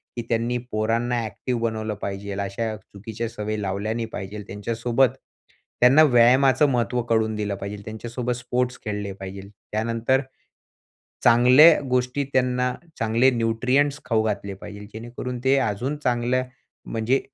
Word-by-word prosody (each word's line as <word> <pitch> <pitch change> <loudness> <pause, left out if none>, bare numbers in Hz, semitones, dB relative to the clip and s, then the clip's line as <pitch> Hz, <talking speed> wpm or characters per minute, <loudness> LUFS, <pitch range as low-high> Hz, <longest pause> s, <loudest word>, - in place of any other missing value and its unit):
की 120 - -2
त्यांनी 115 +1 0
पोरांना 115 +2 0
एक्टिव्ह 115 +3 -4
बनवलं 110 -2 -2
पाहिजे. 100 0 -4
अशा 105 +3 -3
चुकीच्या 110 +3 -7
सवयी 110 -1 -4
लावल्या 100 +2 -2
नाही 115 0 -2
पाहिजे. 105 +2 -6
त्यांच्यासोबत 115 +5 +1 0.7
त्यांना 130 +6 +7
व्यायामाचं 130 +2 +5
महत्त्व 125 -1 0
कळवून 110 -2 +1
दिलं 105 -1 -2
पाहिजे 100 +1 -6
त्यांच्यासोबत 120 +3 -4
स्पोर्ट्स 125 0 -2
खेळले 105 -1 -3
पाहिजे. 95 0 -9 0.2
त्यानंतर, 115 +4 +1 1.0
चांगल्या 125 +7 +7
गोष्टी 125 +2 0
त्यांना 125 0 +1 0.3
चांगले 115 +3 +3
न्यूट्रिएंट्स 125 +5 +1
खाऊ 110 -2 +2
घातले 100 -2 -2
पाहिजे 100 +1 -10
जेणेकरून 120 +2 -6
ते 135 +1 +4
अजून 120 +6 -1
चांगल्या 125 +1 +1 0.4
म्हणजे 115 +4 0
115 Hz, 130 wpm, -24 LUFS, 105-125 Hz, 1.0 s, त्यांना